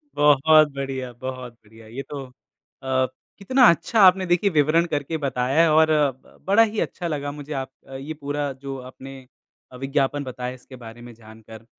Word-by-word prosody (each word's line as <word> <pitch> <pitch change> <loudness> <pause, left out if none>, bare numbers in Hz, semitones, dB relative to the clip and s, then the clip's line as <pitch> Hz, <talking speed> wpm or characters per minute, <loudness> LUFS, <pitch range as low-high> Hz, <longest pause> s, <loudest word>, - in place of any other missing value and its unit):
बहुत 150 +1 +5
बढ़िया, 135 -2 -4
बहुत 130 0 -7
बढ़िया। 110 0 -18
ये 120 +5 -7
तो 140 -2 -6 0.6
अ, 130 0 +1 0.3
कितना 255 +6 +2
अच्छा 170 +7 +1
आपने 185 0 +6
देखिए 175 +3 +2
विवरण 155 +1 +2
करके 145 +1 -3
बताया 140 +3 +1
और 160 0 +4
ब 145 -4 -1
बड़ा 205 +4 +5
ही 215 -1 -2
अच्छा 175 - -3
लगा 145 -3 -3
मुझे 145 +1 -8
आप 135 -1 -4 0.3
ये 150 +3 -6
पूरा 145 -1 -4
जो 135 0 -7
आपने 135 +1 -11 0.5
अ, - - -12
विज्ञापन 135 +1 -1
बताया 125 -1 -6
इसके 130 +1 -14
बारे 120 -1 -12
में 120 0 -11
जान 110 0 -16
कर। 110 0 -12
140 Hz, 175 wpm, -23 LUFS, 130-155 Hz, 0.6 s, आपने